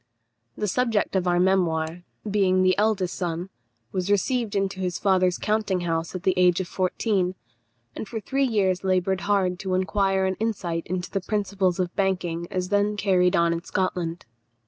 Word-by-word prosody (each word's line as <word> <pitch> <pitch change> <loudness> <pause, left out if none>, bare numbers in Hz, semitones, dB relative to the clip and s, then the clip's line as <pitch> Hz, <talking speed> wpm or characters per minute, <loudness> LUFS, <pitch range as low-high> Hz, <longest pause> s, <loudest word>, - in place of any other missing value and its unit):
The 210 - -1
subject 225 -1 0
of 185 -1 +1
our 175 0 +3
memoir, 175 -3 +1 0.3
being 190 -2 +2
the 185 0 +4
eldest 205 -4 +1
son, 175 +1 -3 0.4
was 185 0 -2
received 220 +2 +1
into 195 -1 -1
his 180 -2 -2
father's 185 -2 +2
counting 210 -4 0
house 165 0 -2
at 185 - -5
the 190 - +3
age 180 -1 +4
of 185 - -3
fourteen, 185 0 0 0.6
and - - -5
for 225 0 -4
three 270 +5 0
years 195 -6 +1
laboured 190 0 +1
hard 195 -3 +1
to 190 -1 -1
acquire 195 0 +1
an 190 0 -1
insight 190 -7 -2
into 180 0 -3
the 195 - -1
principles 195 -2 -1
of 180 -1 -2
banking 180 -3 -1
as 185 -1 -2
then 205 +1 +1
carried 185 -2 +3
on 170 0 +3
in 170 0 -4
Scotland. 180 -3 -2
185 Hz, 170 wpm, -25 LUFS, 180-200 Hz, 0.6 s, the